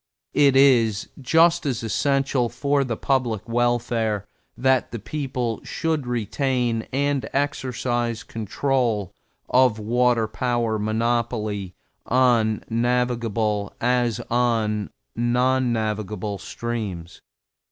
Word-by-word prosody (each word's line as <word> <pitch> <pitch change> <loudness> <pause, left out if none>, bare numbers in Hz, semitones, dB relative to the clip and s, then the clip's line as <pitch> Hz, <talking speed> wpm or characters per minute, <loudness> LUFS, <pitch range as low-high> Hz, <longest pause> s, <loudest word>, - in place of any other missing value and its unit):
It 140 -2 +4
is 120 -7 +4
just 165 +5 +4
as 125 -4 -2
essential 135 +1 +1
for 140 +4 +1
the 120 -4 -3
public 125 -6 0
welfare 115 -3 0 0.3
that 130 -1 +2
the 115 - -5
people 125 0 -3
should 160 -5 -2
retain 120 0 -1
and 140 0 0
exercise 120 -4 -1
control 115 -2 -1 0.3
of 125 -3 +4
water 120 +1 +2
power 115 -1 -1
monopoly 110 -3 -1 0.3
on 120 -4 +3
navigable 115 -3 0
as 120 -1 +1
on 115 -4 +1 0.3
non 125 +2 +2
navigable 105 -2 -2
streams. 105 -8 -5
120 Hz, 95 wpm, -23 LUFS, 110-130 Hz, 0.3 s, It